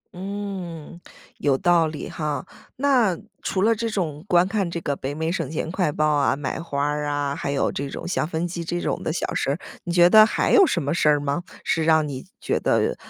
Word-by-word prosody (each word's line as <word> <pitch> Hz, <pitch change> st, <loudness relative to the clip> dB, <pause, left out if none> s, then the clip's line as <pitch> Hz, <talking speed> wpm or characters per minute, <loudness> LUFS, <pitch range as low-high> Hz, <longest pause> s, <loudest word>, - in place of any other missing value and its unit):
嗯， 185 Hz, -4 st, -6 dB, 0.4 s
有 140 Hz, -2 st, +2 dB
道 175 Hz, -2 st, +3 dB
理 155 Hz, -1 st, -6 dB
哈。 150 Hz, -2 st, -3 dB, 0.3 s
那 250 Hz, -10 st, +2 dB, 0.2 s
除 190 Hz, -, -1 dB
了 230 Hz, +2 st, +5 dB
这 230 Hz, +1 st, -2 dB
种 160 Hz, -8 st, -3 dB
观 180 Hz, -1 st, +4 dB
看 195 Hz, -3 st, -1 dB
这 170 Hz, 0 st, -3 dB
个 140 Hz, -, -1 dB
北 135 Hz, +1 st, -5 dB
美 160 Hz, +2 st, -1 dB
省 165 Hz, -6 st, -2 dB
钱 160 Hz, +1 st, -3 dB
快 180 Hz, -4 st, 0 dB
报 155 Hz, +1 st, 0 dB
啊， 145 Hz, -2 st, +2 dB
买 140 Hz, -1 st, -4 dB
花 140 Hz, -4 st, -2 dB
儿 150 Hz, 0 st, -1 dB
啊， 145 Hz, -1 st, -1 dB
还 140 Hz, -, -4 dB
有 140 Hz, -, +1 dB
这 140 Hz, 0 st, -4 dB
种 -, -, -6 dB
像 175 Hz, -, 0 dB
分 165 Hz, +1 st, -2 dB
期 170 Hz, 0 st, -5 dB
这 175 Hz, +1 st, -2 dB
种 -, -, -2 dB
的 -, -, -2 dB
小 170 Hz, -, -2 dB
事 -, -, -1 dB
儿， 145 Hz, -, -1 dB, 0.3 s
你 175 Hz, -, -3 dB
觉 175 Hz, 0 st, +6 dB
得 215 Hz, 0 st, +9 dB
还 220 Hz, -, +1 dB
有 390 Hz, -5 st, +7 dB
什 170 Hz, -, 0 dB
么 145 Hz, +3 st, -1 dB
事 155 Hz, -, +3 dB
儿 145 Hz, -1 st, +4 dB
吗？ 145 Hz, +3 st, -1 dB, 0.2 s
是 160 Hz, -, 0 dB
让 160 Hz, -1 st, +3 dB
你 135 Hz, -2 st, -6 dB
觉 -, -, -1 dB
得， -, -, +1 dB
165 Hz, 245 characters per minute, -23 LUFS, 145-180 Hz, 0.4 s, 得